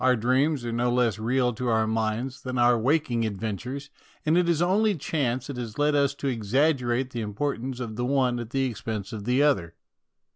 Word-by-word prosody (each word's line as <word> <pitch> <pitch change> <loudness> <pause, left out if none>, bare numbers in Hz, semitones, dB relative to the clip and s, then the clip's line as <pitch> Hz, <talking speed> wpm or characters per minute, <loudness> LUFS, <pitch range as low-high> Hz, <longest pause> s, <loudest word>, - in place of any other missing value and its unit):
Our 130 0 +4
dreams 130 +4 +1
are 120 - -2
no 120 +1 +1
less 120 -4 +1
real 125 +2 +1
to 125 +3 -4
our 110 -1 +2
minds 110 +4 -2
than 130 -1 -4
our 120 0 +5
waking 125 0 +1
adventures, 115 +7 -4 0.3
and 155 +2 +3
it 175 -1 +3
is 165 -3 +2
only 200 +4 +3
chance 130 -5 -1
that 140 -3 -6
has 115 -3 -6
led 145 +1 +2
us 140 -1 +2
to 140 - -4
exaggerate 125 +1 +1
the 120 - -3
im 105 -2 -5
portance 130 -1 -2
of 110 -3 -5
the 120 - -1
one 130 -2 +1
at 120 -2 -6
the 135 +2 0
expense 110 -4 -4
of 105 -2 -6
the 125 +4 +3
other. 95 - +1
125 Hz, 210 wpm, -26 LUFS, 115-140 Hz, 0.3 s, our